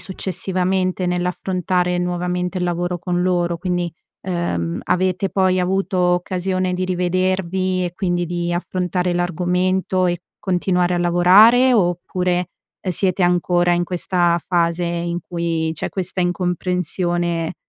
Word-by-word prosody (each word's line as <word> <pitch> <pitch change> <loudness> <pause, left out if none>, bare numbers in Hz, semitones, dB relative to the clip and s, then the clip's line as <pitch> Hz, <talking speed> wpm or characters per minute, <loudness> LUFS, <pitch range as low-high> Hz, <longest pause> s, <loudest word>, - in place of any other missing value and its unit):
successivamente 185 -1 -1
nell'affrontare 180 0 -1
nuovamente 180 +1 -2
il 180 - -1
lavoro 175 0 -1
con 180 +1 -1
loro? 175 -2 0
Quindi, 175 -1 -1 0.3
ehm, 170 - -2
avete 185 +1 0
poi 185 -1 +2
avuto 190 +1 0
occasione 180 +1 0
di 185 +1 -1
rivedervi, 185 0 0
e 175 - -3
quindi 175 -2 -1
di 175 0 -2
affrontare 180 0 -1
l'argomento 180 +1 0
e 175 0 -1 0.2
continuare 180 -1 +1
a - - 0
lavorare, 200 +9 +6
oppure, 180 -2 0 0.3
ehm, 185 - -3
siete 185 +1 0
ancora 175 0 +2
in 175 0 +1
questa 175 -1 +1
fase 170 -1 +1
in 170 0 -2
cui 165 -2 -2
c'è - - -4
questa 185 -1 -3
incomprensione, 175 -1 -1
180 Hz, 120 wpm, -20 LUFS, 175-185 Hz, 0.3 s, lavorare